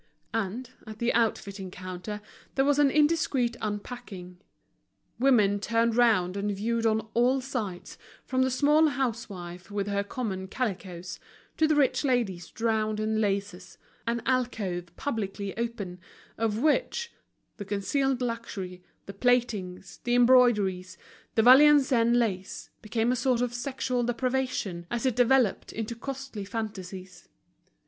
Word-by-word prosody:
And, 225 Hz, +4 st, -3 dB, 0.2 s
at 215 Hz, -1 st, -8 dB
the 235 Hz, +2 st, 0 dB
outfitting 200 Hz, -4 st, -1 dB
counter, 185 Hz, +3 st, -7 dB, 0.3 s
there 270 Hz, -, +3 dB
was 290 Hz, 0 st, +3 dB
an 290 Hz, -1 st, +5 dB
indiscreet 295 Hz, -5 st, +2 dB
unpacking, 205 Hz, -4 st, -6 dB, 0.8 s
women 215 Hz, -6 st, +4 dB
turned 230 Hz, +2 st, +1 dB
round 215 Hz, -7 st, +3 dB
and 205 Hz, +1 st, -1 dB
viewed 225 Hz, +3 st, 0 dB
on 220 Hz, 0 st, +2 dB
all 250 Hz, +3 st, +3 dB
sides, 235 Hz, -9 st, -5 dB, 0.3 s
from 260 Hz, 0 st, 0 dB
the 260 Hz, -, +3 dB
small 295 Hz, +4 st, +4 dB
housewife 210 Hz, -, -4 dB
with 205 Hz, -1 st, -2 dB
her 200 Hz, 0 st, -1 dB
common 200 Hz, -3 st, -4 dB
calicoes, 185 Hz, -6 st, -4 dB, 0.4 s
to 315 Hz, -, +4 dB
the 310 Hz, -, +2 dB
rich 285 Hz, 0 st, +2 dB
lady 240 Hz, -10 st, +1 dB
drowned 220 Hz, -1 st, 0 dB
in 220 Hz, 0 st, 0 dB
laces, 195 Hz, -3 st, -2 dB, 0.3 s
an 235 Hz, 0 st, -1 dB
alcove 225 Hz, -9 st, -1 dB
publicly 200 Hz, -6 st, -3 dB
open, 220 Hz, -6 st, -4 dB, 0.4 s
of 220 Hz, -1 st, -1 dB
which, 470 Hz, -, 0 dB, 0.4 s
the 205 Hz, -, -6 dB
concealed 250 Hz, +7 st, 0 dB
luxury, 205 Hz, -6 st, -5 dB, 0.2 s
the 195 Hz, -, -8 dB
plaitings, 200 Hz, -6 st, 0 dB
the 240 Hz, 0 st, +1 dB
embroideries, 235 Hz, -7 st, +4 dB, 0.4 s
the 225 Hz, -, +4 dB
Valenciennes 260 Hz, -3 st, +6 dB
lace, 195 Hz, -6 st, -2 dB
became 225 Hz, +2 st, 0 dB
a -, -, +1 dB
sort 250 Hz, 0 st, +1 dB
of 245 Hz, -1 st, -1 dB
sexual 250 Hz, 0 st, -2 dB
depravation, 245 Hz, -8 st, -2 dB
as 240 Hz, +2 st, -2 dB
it 255 Hz, -4 st, +2 dB
developed 245 Hz, -3 st, +3 dB
into 225 Hz, +1 st, -4 dB
costly 270 Hz, -3 st, -6 dB
fantasies. 190 Hz, -4 st, -7 dB
225 Hz, 130 wpm, -28 LUFS, 195-250 Hz, 0.8 s, Valenciennes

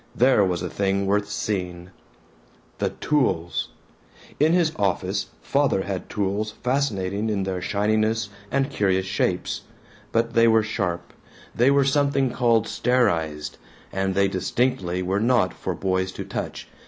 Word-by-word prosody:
There 125 Hz, -4 st, +5 dB
was 90 Hz, -3 st, 0 dB
a -, -, -1 dB
thing 100 Hz, 0 st, 0 dB
worth 105 Hz, +1 st, +1 dB
seeing! 90 Hz, -4 st, -3 dB, 0.9 s
The -, -, +1 dB
tools! 105 Hz, -, 0 dB, 0.7 s
In 155 Hz, +2 st, +4 dB
his 170 Hz, -2 st, +3 dB
office 95 Hz, -1 st, 0 dB, 0.2 s
Father 140 Hz, -9 st, +2 dB
had 95 Hz, -2 st, -4 dB
tools 105 Hz, +1 st, -1 dB
fascinating 110 Hz, -6 st, 0 dB
in 100 Hz, -2 st, 0 dB
their 95 Hz, -1 st, -3 dB
shininess 110 Hz, +2 st, +1 dB, 0.2 s
and 135 Hz, +3 st, 0 dB
curious 95 Hz, -6 st, +1 dB
shapes, 95 Hz, -, -1 dB, 0.5 s
but 115 Hz, 0 st, +1 dB
they 115 Hz, 0 st, +5 dB
were 110 Hz, -1 st, +5 dB
sharp, 100 Hz, -5 st, -3 dB, 0.4 s
they 120 Hz, +3 st, +4 dB
were 140 Hz, -1 st, +4 dB
something 140 Hz, -2 st, +2 dB
called 115 Hz, -3 st, +2 dB
sterized, 80 Hz, -14 st, 0 dB, 0.4 s
and 95 Hz, 0 st, -1 dB
they 100 Hz, 0 st, +4 dB
distinctly 95 Hz, -2 st, 0 dB
were 95 Hz, +2 st, 0 dB
not 115 Hz, -5 st, +2 dB
for -, -, -4 dB
boys 95 Hz, -1 st, -1 dB
to -, -, -6 dB
touch. -, -, -5 dB
105 Hz, 140 wpm, -24 LUFS, 95-120 Hz, 0.9 s, There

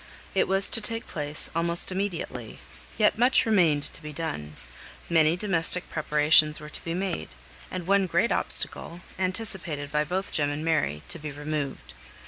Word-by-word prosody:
It 190 Hz, -, +2 dB
was 195 Hz, 0 st, +2 dB
to 225 Hz, -, +6 dB
take 225 Hz, +2 st, +1 dB
place 150 Hz, -1 st, -3 dB
almost 170 Hz, +2 st, +4 dB
immediately: 170 Hz, -, -4 dB, 0.4 s
yet 215 Hz, 0 st, +2 dB
much 250 Hz, +2 st, +4 dB
remained 170 Hz, -10 st, +3 dB
to -, -, -8 dB
be 150 Hz, -1 st, -8 dB
done; 75 Hz, -, -5 dB, 0.6 s
many 160 Hz, 0 st, +3 dB
domestic 180 Hz, -3 st, +1 dB
preparations 150 Hz, 0 st, +3 dB
were 150 Hz, 0 st, -10 dB
to -, -, -5 dB
be 165 Hz, 0 st, -4 dB
made; 185 Hz, -, -3 dB, 0.4 s
and 185 Hz, -2 st, -6 dB
one 195 Hz, 0 st, +2 dB
great 175 Hz, +7 st, +1 dB
obstacle, 170 Hz, +1 st, +1 dB, 0.2 s
anticipated 185 Hz, -7 st, -2 dB
by 150 Hz, +1 st, +1 dB
both 185 Hz, +5 st, -3 dB
Jem 145 Hz, -2 st, 0 dB
and 145 Hz, +2 st, -4 dB
Mary, 145 Hz, -, 0 dB
to 170 Hz, -, 0 dB
be 150 Hz, -1 st, -6 dB
removed. 145 Hz, -1 st, -5 dB
165 Hz, 160 wpm, -26 LUFS, 150-190 Hz, 0.6 s, to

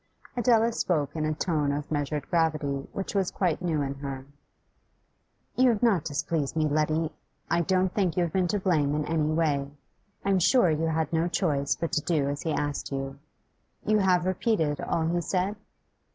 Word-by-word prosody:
Adela 235 Hz, -1 st, +3 dB
spoke 155 Hz, -10 st, -1 dB
in 155 Hz, -1 st, -1 dB
a 155 Hz, -, 0 dB
tone 150 Hz, -4 st, 0 dB
of 145 Hz, +1 st, -4 dB
measured 145 Hz, -1 st, -2 dB
gravity 155 Hz, -4 st, 0 dB
which 195 Hz, -, -4 dB
was 195 Hz, -3 st, +1 dB
quite 180 Hz, -4 st, -1 dB
new 160 Hz, -5 st, 0 dB
in 135 Hz, 0 st, -2 dB
her. 135 Hz, -1 st, -6 dB, 1.3 s
'You 255 Hz, 0 st, +5 dB
have 230 Hz, -1 st, 0 dB
not 200 Hz, -10 st, +3 dB
displeased 150 Hz, 0 st, -2 dB
me, 155 Hz, -1 st, +2 dB
Letty. 155 Hz, +1 st, 0 dB, 0.4 s
I 170 Hz, -, +3 dB
don't 185 Hz, +2 st, +1 dB
think 185 Hz, -5 st, 0 dB
you 180 Hz, -, +3 dB
have 170 Hz, -, -3 dB
been 185 Hz, -2 st, +2 dB
to 205 Hz, +4 st, 0 dB
blame 155 Hz, -7 st, +1 dB
in 150 Hz, 0 st, -1 dB
any 155 Hz, -1 st, 0 dB
way; 150 Hz, -4 st, +1 dB, 0.6 s
I 200 Hz, -, +2 dB
am 190 Hz, -, +3 dB
sure 185 Hz, 0 st, +4 dB
you 160 Hz, +1 st, 0 dB
had 160 Hz, -1 st, -1 dB
no 165 Hz, +1 st, +2 dB
choice 145 Hz, -6 st, 0 dB
but 165 Hz, -, -3 dB
to 150 Hz, -, +1 dB
do 155 Hz, -3 st, 0 dB
as 145 Hz, 0 st, -3 dB
he 160 Hz, -, -2 dB
asked 145 Hz, -1 st, -2 dB
you. 135 Hz, 0 st, -4 dB, 0.7 s
You 215 Hz, 0 st, +3 dB
have 180 Hz, -2 st, +3 dB
repeated 185 Hz, -5 st, 0 dB
all 160 Hz, -, 0 dB
he 175 Hz, +2 st, 0 dB
said? 185 Hz, +4 st, -1 dB
160 Hz, 190 wpm, -27 LUFS, 145-185 Hz, 1.3 s, You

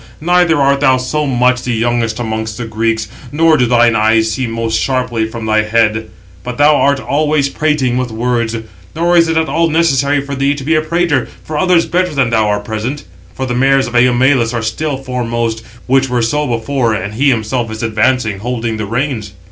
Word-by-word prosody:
Neither 175 Hz, 0 st, +2 dB
art 140 Hz, 0 st, +2 dB
thou 130 Hz, -2 st, +3 dB
so 145 Hz, +4 st, -2 dB
much 125 Hz, -1 st, +2 dB
the 125 Hz, -1 st, -2 dB
youngest 115 Hz, -1 st, -1 dB
amongst 110 Hz, -2 st, -4 dB
the 120 Hz, -, -4 dB
Greeks, 110 Hz, 0 st, -1 dB, 0.2 s
nor 160 Hz, +1 st, +3 dB
do 125 Hz, -4 st, +2 dB
thine 120 Hz, -1 st, +3 dB
eyes 110 Hz, +1 st, +2 dB
see 130 Hz, 0 st, -2 dB
most 115 Hz, -1 st, -2 dB
sharply 125 Hz, -4 st, -1 dB
from 115 Hz, 0 st, -7 dB
thy 110 Hz, 0 st, +2 dB
head: 110 Hz, 0 st, +1 dB, 0.4 s
but 125 Hz, 0 st, -6 dB
thou 150 Hz, +1 st, +5 dB
art 140 Hz, 0 st, +2 dB
always 150 Hz, 0 st, 0 dB
prating 140 Hz, -5 st, 0 dB
with 125 Hz, -1 st, -2 dB
words. 115 Hz, 0 st, -1 dB, 0.4 s
Nor 170 Hz, +2 st, +1 dB
is 165 Hz, -1 st, +5 dB
it 160 Hz, 0 st, 0 dB
at 160 Hz, 0 st, +1 dB
all 165 Hz, 0 st, +1 dB
necessary 145 Hz, -3 st, +2 dB
for 140 Hz, 0 st, -6 dB
thee 140 Hz, +1 st, 0 dB
to 140 Hz, -, -7 dB
be 160 Hz, +4 st, +1 dB
a 155 Hz, -, +3 dB
prater, 155 Hz, -4 st, 0 dB, 0.2 s
for 155 Hz, -, -6 dB
others 180 Hz, 0 st, +3 dB
better 180 Hz, -2 st, -1 dB
than 130 Hz, -4 st, +1 dB
thou 110 Hz, -2 st, +2 dB
are 105 Hz, 0 st, 0 dB
present. 110 Hz, +7 st, -4 dB, 0.3 s
For 130 Hz, -, -3 dB
the 125 Hz, -, -3 dB
mares 135 Hz, +2 st, +2 dB
of 120 Hz, -, -7 dB
Eumelus 125 Hz, 0 st, +3 dB
are 115 Hz, -, -2 dB
still 135 Hz, +6 st, -2 dB
756 135 Hz, -, -14 dB
foremost, 120 Hz, -3 st, -2 dB, 0.2 s
which 135 Hz, +1 st, +2 dB
were 125 Hz, -1 st, 0 dB
so 150 Hz, +6 st, 0 dB
before, 120 Hz, 0 st, -1 dB
and 100 Hz, +1 st, -4 dB
he 140 Hz, +6 st, +2 dB
himself 115 Hz, 0 st, -1 dB
is 110 Hz, +1 st, -6 dB
advancing, 110 Hz, -1 st, 0 dB
holding 115 Hz, 0 st, -3 dB
the 105 Hz, -1 st, -4 dB
reins." 115 Hz, -3 st, -3 dB
125 Hz, 205 wpm, -14 LUFS, 115-140 Hz, 0.4 s, thou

